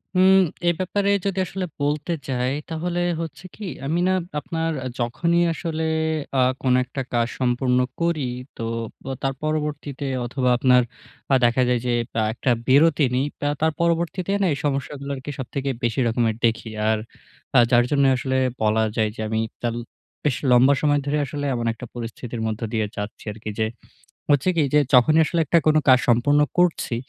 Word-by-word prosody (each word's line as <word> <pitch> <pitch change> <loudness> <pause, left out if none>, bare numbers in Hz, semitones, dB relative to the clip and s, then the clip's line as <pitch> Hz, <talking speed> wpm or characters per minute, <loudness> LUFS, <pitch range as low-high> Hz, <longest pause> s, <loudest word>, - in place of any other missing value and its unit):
হুম, 190 +1 +6 0.3
এ - - +7
ব্যাপারে 200 +2 0 0.2
যদি 195 -1 -1
আসলে 185 +1 -4 0.2
বলতে 150 +3 0
যাই, 125 0 0 0.2
তাহলে 175 +2 -2 0.2
হচ্ছে 165 +2 -7
কি 210 - -8 0.2
আমি 160 +5 0
না 185 - +3 0.3
আপনার 165 +2 -2 0.3
যখনই 170 +9 +1
আসলে 160 -1 -3 0.6
আ - - +5 0.2
কোন 130 -1 +2
একটা 130 +2 -5
কাজ 120 -1 +2
সম্পূর্ণ 125 0 +1 0.2
করি, 165 -5 0 0.3
তো - - -5 0.4
বা 135 - -4
তার 135 0 0
পরবর্তীতে 150 -2 -3 0.2
অথবা, 125 +1 0
আপনার 125 0 +5 0.5
আ - - +7
দেখা 120 +2 +3
যায় 125 -1 +2
যে 120 - +1 0.3
আ - - +2
একটা 125 +2 0 0.2
বিরতি 145 +2 +5
নেই। 130 - +1
বা, 145 - -1
তার 160 0 +3
পরবর্তীতে 170 +3 0 0.2
এই 140 - -1
সমস্যাগুলোকে 140 0 -3
সবথেকে 135 +2 -3
বেশি 120 +1 0
রকমের 115 -1 +1
দেখি। 115 0 0 0.2
আর 110 - +2 0.6
আ - - +9
যার 120 0 +6
জন্য 140 -1 +3
আসলে 130 +1 -1 0.2
বলা 110 +1 +2
যায় 110 -1 +1
যে, - - -6
আমি 110 0 0 0.2
তাল 120 -1 -1 0.5
বেশ 145 -4 +1 0.2
লম্বা 125 +3 +6
সময় 145 -1 +3
ধরে 145 +1 0
আসলে 145 +2 -4
এমন 120 -1 -2
একটা 115 - -9
পরিস্থিতির 120 0 -6
মধ্য 110 0 -4
দিয়ে 110 -2 +1
যাচ্ছি 105 +1 -6
আরকি। 110 +1 -7
যে 110 - +2 0.6
হচ্ছে 145 +4 +3
কি 165 - +3
যে, 150 - +6
যখনই 155 +6 +6
আসলে 170 - -1
একটা 170 - +3 0.3
কাজ 130 -1 +7
সম্পূর্ণ 135 +5 +4 0.2
করছি, 175 -8 +2
135 Hz, 170 wpm, -23 LUFS, 120-160 Hz, 0.6 s, আ